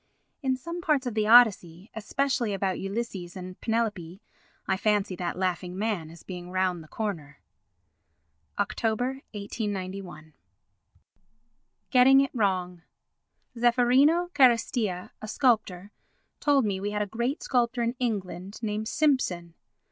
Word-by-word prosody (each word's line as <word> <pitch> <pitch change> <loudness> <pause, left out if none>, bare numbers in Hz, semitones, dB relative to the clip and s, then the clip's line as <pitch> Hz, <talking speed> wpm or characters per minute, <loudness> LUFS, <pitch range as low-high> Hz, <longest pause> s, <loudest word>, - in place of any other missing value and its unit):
In 260 -2 0
some 335 +6 -6
parts 300 -6 +1
of 245 - -2
the 215 -1 0
Odyssey, 205 -6 +5
especially 235 0 -1
about 190 -1 -1
Ulysses 195 -4 -4
and 185 0 -9
Penelope, 210 -6 -2 0.5
I 190 - +2
fancy 205 -1 0
that 175 0 -3
laughing 180 -1 -2
man 200 -6 -2
as 165 0 -14
being 180 -1 -8
round 185 -2 -1
the - - -16
corner. 160 -9 -5 1.2
[Oct. - - -2
1891.] 200 - -4 1.6
Getting 265 +1 +7
it 275 - -1
Wrong 185 -6 -1 0.7
Zeffirino 255 +9 +3
Carestia, 230 -8 +2
a 215 - -6
sculptor, 215 -6 +1 0.5
told 280 -4 +3
me 195 -2 -1
we 200 +2 -2
had 210 0 -1
a - - -3
great 235 +8 -3
sculptor 240 -1 +1
in 235 +1 0
England 200 -5 -3
named 215 0 -2
Simpson. 225 - 0
210 Hz, 125 wpm, -27 LUFS, 185-245 Hz, 1.6 s, Getting